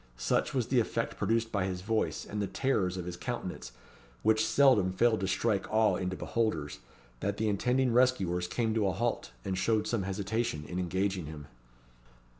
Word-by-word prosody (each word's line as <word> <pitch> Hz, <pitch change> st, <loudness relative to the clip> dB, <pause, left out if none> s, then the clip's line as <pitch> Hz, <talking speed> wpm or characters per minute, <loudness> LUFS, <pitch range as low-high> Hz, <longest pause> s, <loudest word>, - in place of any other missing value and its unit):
Such -, -, 0 dB
was -, -, 0 dB
the -, -, +4 dB
effect -, -, -1 dB
produced 115 Hz, 0 st, +1 dB
by 100 Hz, -3 st, 0 dB
his 90 Hz, -1 st, -3 dB
voice, 110 Hz, +2 st, -1 dB
and 105 Hz, 0 st, -4 dB
the 100 Hz, -, -1 dB
terrors 95 Hz, -9 st, 0 dB
of 90 Hz, -, -4 dB
his 90 Hz, -1 st, -5 dB
countenance, 65 Hz, -, -5 dB, 0.5 s
which 110 Hz, 0 st, +4 dB
seldom 110 Hz, -5 st, +4 dB
failed 110 Hz, +3 st, +3 dB
to 95 Hz, -, -1 dB
strike 95 Hz, +1 st, 0 dB
awe 110 Hz, 0 st, +3 dB
into 95 Hz, -1 st, -2 dB
beholders, 90 Hz, -13 st, -2 dB, 0.4 s
that 100 Hz, +5 st, -2 dB
the 110 Hz, -, 0 dB
intending 125 Hz, +4 st, +1 dB
rescuers 95 Hz, -9 st, +2 dB
came 110 Hz, +3 st, 0 dB
to 110 Hz, -3 st, +1 dB
a 95 Hz, -, 0 dB
halt, 120 Hz, -, -1 dB, 0.2 s
and 95 Hz, -, -1 dB
showed 110 Hz, +3 st, +1 dB
some 115 Hz, -1 st, 0 dB
hesitation 100 Hz, -2 st, -2 dB
in 90 Hz, -, -4 dB
engaging 95 Hz, -1 st, -1 dB
him. 75 Hz, -1 st, -8 dB
100 Hz, 180 wpm, -30 LUFS, 90-115 Hz, 0.5 s, the